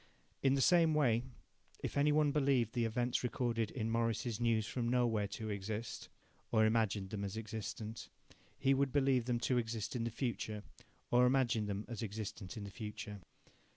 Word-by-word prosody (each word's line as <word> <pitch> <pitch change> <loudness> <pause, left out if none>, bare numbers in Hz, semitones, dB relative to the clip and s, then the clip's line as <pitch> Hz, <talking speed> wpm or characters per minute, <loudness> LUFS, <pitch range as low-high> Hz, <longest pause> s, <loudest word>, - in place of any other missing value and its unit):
In 135 0 +4
the 135 - +1
same 165 -1 +5
way, 120 -6 +3 0.6
if - - -3
any 145 +1 +4
one 150 -1 +3
believed 135 -6 +2
the 120 -2 +1
events 120 +2 0
recorded 120 -3 0
in 115 -3 -2
Morris's 115 -1 0
News 115 -2 +2
from 120 +1 -2
Nowhere 120 -4 +2
to 110 +2 -5
exist, 105 +3 -4 0.4
or 110 -1 +5
imagined 110 -3 +1
them 100 -2 -3
as 100 +2 -4
existent, 110 0 -5 0.5
he 135 0 +3
would 135 0 +2
believe 135 -3 +3
them 120 -1 0
to 125 0 +2
exist 115 0 -3
in 120 - -1
the 115 - -1
future 110 -3 -3 0.5
or 125 +1 +6
imagine 120 -5 +2
them 100 +1 -3
as 115 -4 -5
existent 105 -1 -5
in 105 - -5
the 100 - -7
future. 105 -1 -6
115 Hz, 175 wpm, -36 LUFS, 110-125 Hz, 0.6 s, or